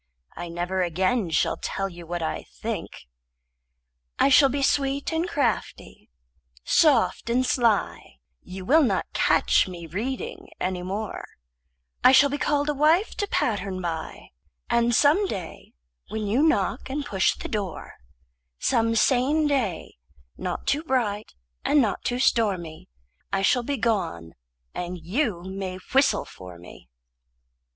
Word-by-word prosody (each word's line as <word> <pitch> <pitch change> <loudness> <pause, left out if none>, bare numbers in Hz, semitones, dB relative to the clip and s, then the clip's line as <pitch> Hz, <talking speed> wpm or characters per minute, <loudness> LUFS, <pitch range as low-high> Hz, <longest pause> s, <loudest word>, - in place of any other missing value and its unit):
I 175 0 -6
never 175 +2 -2
again 185 +4 0
shall 160 - +1
tell 195 - -2
you 175 -3 -11
what 175 0 -3
I 160 - -4
think. - - -5 1.1
I - - +4
shall 275 0 +6
be 280 +1 -1
sweet 275 +2 0
and 330 +3 -1
crafty, 230 - -3 0.5
soft 270 - +3
and 250 +2 +2
sly; 235 - 0 0.3
You 185 0 -9
will 310 +9 +5
not 275 - +1
catch - - +3
me 175 -2 -8
reading 260 - -5
any 185 -1 -2
more; 200 +4 -4 0.8
I 255 - +7
shall 280 +1 +6
be 290 - -2
called 290 0 +1
a 295 - +1
wife 315 +8 +3
to 410 - -1
pattern 195 - -1
by; 165 -3 -5 0.4
And 235 0 +3
some 320 - +4
day 185 - -7 0.3
when 220 -1 -4
you 220 +7 +1
knock 315 -3 +1
and 285 +2 -3
push 195 -8 +1
the - - -7
door, 200 -6 -5 0.6
Some 230 - +1
sane 270 +6 +3
day, 245 - -1 0.4
not - - -4
too 290 +2 +1
bright 225 -8 -1 0.3
and 295 - +3
not 220 -7 0
too 245 -1 -1
stormy, 190 - 0 0.4
I 195 0 0
shall 245 +5 +3
be 280 +3 -3
gone, 190 - -1 0.4
and 180 +1 -4
you 180 - -2
may 190 0 -5 0.2
whistle 270 +1 +3
for 90 -2 -12
me. 85 -7 -14
225 Hz, 140 wpm, -25 LUFS, 185-275 Hz, 1.1 s, I